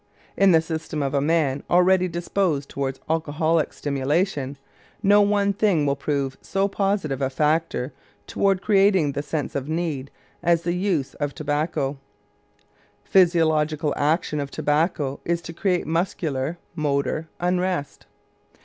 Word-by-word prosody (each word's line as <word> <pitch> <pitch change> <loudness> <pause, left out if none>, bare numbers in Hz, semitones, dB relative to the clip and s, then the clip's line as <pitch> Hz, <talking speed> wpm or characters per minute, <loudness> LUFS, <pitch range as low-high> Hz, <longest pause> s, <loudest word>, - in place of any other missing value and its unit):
In 195 -1 +5
the 165 -2 +5
system 160 -2 -4
of 135 0 -2
a 140 - +2
man 145 -3 +1
already 185 +1 +4
disposed 170 -4 -1
toward 135 -1 -3
alcoholic 160 0 0
stimulation, 145 0 -1 0.5
no 205 +1 +6
one 200 0 +2
thing 195 -7 +2
will 140 -1 +1
prove 140 -2 -2
so 195 +1 0
positive 195 -9 -1
a 135 - +1
factor 150 -1 0 0.3
toward 195 - +1
creating 195 -7 +4
the 140 - -3
sense 145 +1 -3
of 140 +1 -3
need 155 -5 -2 0.3
as 170 -1 +2
the 175 0 0
use 180 -7 -1
of 145 -2 -4
tobacco. 145 -2 -1 1.0
Physiological 160 -4 +3
action 150 +1 0
of 140 -1 -3
tobacco 150 -2 0
is 170 0 0
to 165 - -7
create 180 +1 0
muscular 160 -3 -1 0.2
(motor) 155 0 -1
unrest. 180 -3 -1
160 Hz, 130 wpm, -23 LUFS, 145-180 Hz, 1.0 s, no